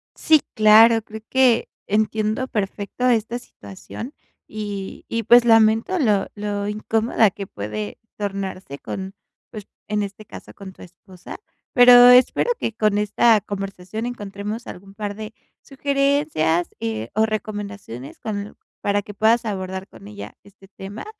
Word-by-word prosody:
Sí, 310 -2 +4
claro, 225 +1 +6
creo 220 0 -10
que 255 -3 +3 0.2
entiendo 215 +3 0
perfecto 205 +2 -3
esta 235 +1 0
situación, 105 - -10 0.3
y 205 -2 -6
y, 230 0 -2
pues 240 +2 +6
lamento 225 +9 +4
lo 210 -8 +2
lo 205 -1 -3
incómoda 220 +1 +1
que 200 0 -8
puede 105 - -6 0.2
tornarse 195 -7 -5
con, 190 0 -6 0.4
pues, 210 -3 -9 0.2
en 210 0 -1
este 200 +2 -8
caso - - -12
con 195 -2 -11
tu - - -18
esposa. 180 +1 -12 0.4
Pero 245 0 +9
espero 250 - +5
que 225 - -2
con 215 -2 +1
esta 210 +2 +3
conversación 195 +2 -6
encontremos 210 0 -6
algún 195 +2 -11
par 205 -1 -5
de 220 +1 -8 0.3
sugerencias, 275 - 0
eh, 110 0 -4
o 220 +2 +3
recomendaciones 205 - -6
con 215 -2 -4
l 200 +1 -8 0.3
para 205 0 0
que 205 0 -11
puedas 220 +3 +2
abordar 190 -2 -4
con 100 - -14
ella 105 0 -10
este 200 -1 -19
tema, 195 +2 -9
210 Hz, 140 wpm, -21 LUFS, 195-225 Hz, 0.4 s, Pero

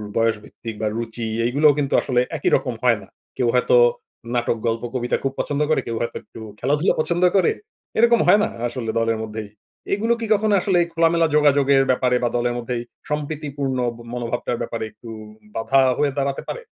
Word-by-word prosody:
বয়সভিত্তিক 115 0 -2
বা 110 - 0
রুচি 115 0 -4 0.2
এইগুলাও 145 +5 +4
কিন্তু 140 -1 -1
আসলে 125 -2 +1 0.2
একই 145 - +1
রকম 125 - -1
হয় 120 -3 +4
না। 95 - -14 0.3
কেউ 125 - +1
হয়তো 125 - +3 0.6
নাটক, 120 -1 0
গল্প, 115 0 -1
কবিতা 125 -1 0
খুব 135 -1 -1
পছন্দ 145 0 -1
করে, 155 - +2
কেউ 115 - -2
হয়তো 120 - -3
একটু - - -13 0.2
খেলাধুলা 145 +7 +2
পছন্দ 170 +3 0
করে। 185 -4 +4 0.5
এরকম 235 +1 +5
হয় 205 - +7
না - - +1 0.2
আসলে 120 -2 -4
দলের 115 0 +1
মধ্যেই। 110 -1 -6 0.4
এগুলো 225 +4 +1
কি 230 - -3
কখনো 215 0 +1
আসলে 180 -1 +2
খোলামেলা 165 0 +3
যোগাযোগের 140 -2 +4
ব্যাপারে 125 -1 +2
বা 120 - +2
দলের 120 0 0
মধ্যে 120 +1 -3 0.3
সম্প্রীতিপূর্ণ 145 -2 -3 0.4
মনোভাবটার 120 0 -2
ব্যাপারে 115 - -3
একটু 110 +2 -13 0.5
বাধা 135 +4 +3 0.2
হয়ে 145 -1 +1
দাঁড়াতে 140 0 -1
পারে? - - -4
130 Hz, 170 wpm, -22 LUFS, 115-150 Hz, 0.6 s, হয়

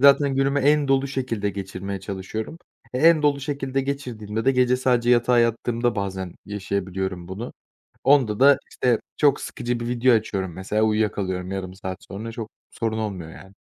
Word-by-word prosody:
zaten 140 0 +6
günümü 135 +1 +2
en 145 +1 +3
dolu 135 0 +2
şekilde 120 -7 -2
geçirmeye 95 0 -5
çalışıyorum. 110 - -5 0.4
E, - - 0
en 160 +1 +6
dolu 145 -1 +2
şekilde 135 -1 -2
geçirdiğimde 120 -6 -4
de 135 - +4
gece 125 -1 +3
sadece 125 -2 +2
yatağa 120 0 +4
yattığımda 115 +1 +1
bazen 95 -2 -3
yaşayabiliyorum 95 -3 -3
bunu. 100 +6 -6 0.5
Onda 130 -7 +4
da, 140 +2 +7
işte, 120 -3 +1 0.2
çok 145 -2 +3
sıkıcı 120 -2 -3
bir 120 - -4
video 125 +1 +3
açıyorum, 95 -5 -2
mesela, 100 +4 -1
uyuyakalıyorum 100 -4 0
yarım 95 -1 -4
saat 95 -1 -6
sonra. 110 +4 -5
Çok 110 -1 -6 0.2
sorun 110 -1 -2
olmuyor, 95 -7 -4
yani. 95 0 -13
115 Hz, 160 wpm, -24 LUFS, 100-135 Hz, 0.5 s, da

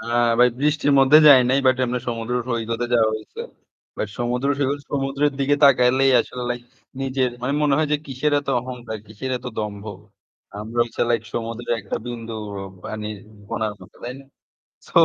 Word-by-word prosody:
হ্যাঁ 120 0 +1
ভাই, 125 0 +7
বৃষ্টির 150 0 +2
মধ্যে 135 +3 +7
যাই 140 -3 +9
নাই 135 - +3
বাট 130 -1 +5
এমনে 125 0 -2
সমুদ্র 115 0 -3 0.2
সৈকতে 115 0 -2
যাওয়া 110 -2 +4
হইছে। 110 - -10 0.6
বাট 110 - -2
সমুদ্র 125 +3 -1
সৈকত 140 0 0
সমুদ্রের 140 +1 0
দিকে 140 +1 +3
তাকাইলেই 130 0 +5
আসলে 125 +1 -6
লাইক 120 0 -3 0.4
নিজের 130 -1 0
মানে 130 +2 0
মনে 145 -2 +3
হয় 155 -1 +1
যে 150 - +4
কিসের 140 +2 -1
এত 140 - -18
অহংকার, 120 -3 -7
কিসের 110 +5 -6
এত 125 - -11
দম্ভ। 105 -1 -4 0.8
আমরা 115 +3 -3
হচ্ছে 120 - -3
লাইক 115 -2 +1
সমুদ্রের 115 +1 -3
একটা 100 - -4
বিন্দু 115 -2 -6 0.3
অ - - -6 0.2
পানির 105 -1 -5 0.3
কণার 110 -1 -2
মতো, 90 - -16
তাই 125 +1 -5
না? - - -16 0.6
সো - - 0
125 Hz, 175 wpm, -22 LUFS, 115-135 Hz, 0.8 s, যাই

